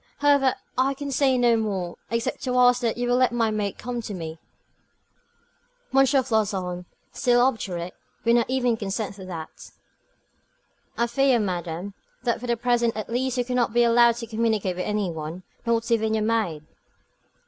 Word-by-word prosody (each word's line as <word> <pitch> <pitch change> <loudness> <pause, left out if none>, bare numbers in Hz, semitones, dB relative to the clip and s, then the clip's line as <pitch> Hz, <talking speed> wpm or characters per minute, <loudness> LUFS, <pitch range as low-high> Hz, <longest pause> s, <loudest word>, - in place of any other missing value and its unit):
However, 285 -2 +3 0.2
I 270 +1 +2
can 285 0 -5
say 265 -1 +3
no 240 -1 +4
more, 195 -6 -2
except 230 0 -2
to 250 -1 0
ask 250 0 +5
that 235 -1 0
you 245 0 -1
will 245 0 +3
let 255 -1 +3
my 230 -2 +1
maid 210 -2 -2
come 240 0 -4
to 210 -3 -6
me." 160 -2 -6 1.5
M. 270 - +5
Floçon, 210 -9 0 0.3
still 245 -1 +3
obdurate, 195 -9 0 0.3
would 235 - +4
not 235 0 +2
even 250 -3 +1
consent 205 -1 -3
to 190 - -9
that. 165 -4 -8 1.3
"I 235 - +2
fear, 270 +1 +3
madame, 180 -1 -3 0.3
that 235 -2 0
for 245 - -6
the 235 -1 +1
present 235 -1 +1
at 215 - -5
least 255 +1 -1
you 245 - +1
cannot 250 -2 0
be 240 0 +4
allowed 235 0 +5
to 235 0 -6
communicate 220 -4 0
with 180 - -2
any 210 -4 -1
one, 160 +3 -6 0.2
not 230 0 +1
even 220 -1 +2
with - - +2
your 215 -1 0
maid." 210 -9 0
230 Hz, 175 wpm, -25 LUFS, 200-245 Hz, 1.5 s, ask